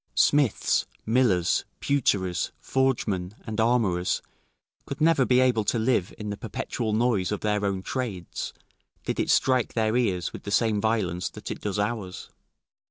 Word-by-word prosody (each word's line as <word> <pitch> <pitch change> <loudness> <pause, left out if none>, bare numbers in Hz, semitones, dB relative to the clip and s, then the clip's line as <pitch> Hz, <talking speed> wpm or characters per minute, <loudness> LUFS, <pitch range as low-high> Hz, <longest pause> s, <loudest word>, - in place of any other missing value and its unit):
] - - -45
Smiths, 145 -7 +3 0.2
millers, 110 -7 +2 0.2
pewterers, 95 -11 +1
forgemen, 110 -8 0
and 110 0 -4
armourers 110 -7 +1 0.6
could 140 - -5
never 155 -4 +4
be 125 0 +4
able 125 -4 +3
to 120 - +1
live 110 -5 +1
in 105 -1 -5
the 100 - -4
perpetual 110 +1 -3
noise 110 -4 +1
of 105 - -2
their 105 -1 0
own 95 -2 -1
trades, 100 -8 -4 0.5
did - - -2
it - - 0
strike 130 -3 +2
their 110 0 +1
ears 95 -8 0
with - - -7
the - - -7
same 105 -1 +2
violence 100 -6 0
that - - -8
it - - -6
does 100 -2 -2
ours. 105 -3 -3
110 Hz, 160 wpm, -26 LUFS, 95-125 Hz, 0.6 s, never